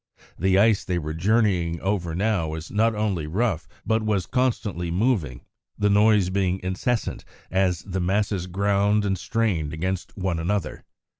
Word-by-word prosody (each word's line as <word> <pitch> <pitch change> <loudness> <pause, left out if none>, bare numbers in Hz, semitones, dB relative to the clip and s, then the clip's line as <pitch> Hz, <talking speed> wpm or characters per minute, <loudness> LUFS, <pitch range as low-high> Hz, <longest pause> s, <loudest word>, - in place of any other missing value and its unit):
The 95 +2 +3
ice 105 0 +4
they 90 -2 -1
were 80 -2 -3
journeying 90 -2 +1
over 95 -4 -1
now 100 -3 +1
was 80 0 -6
not 110 +1 +2
only 100 -7 -1
rough 90 -2 -1 0.2
but 110 0 +1
was 105 -4 0
constantly 105 - -1
moving, 90 - 0 0.4
the 105 0 +2
noise 105 -2 +4
being 95 -1 0
incessant 100 +6 -2 0.3
as 95 -3 +1
the 95 -1 -3
masses 95 0 0
ground 100 +2 +1
and 95 -1 +1
strained 95 -7 -1
against 95 +5 -3
one 95 -3 -1
another. 85 -2 -2
95 Hz, 150 wpm, -24 LUFS, 85-105 Hz, 0.4 s, ice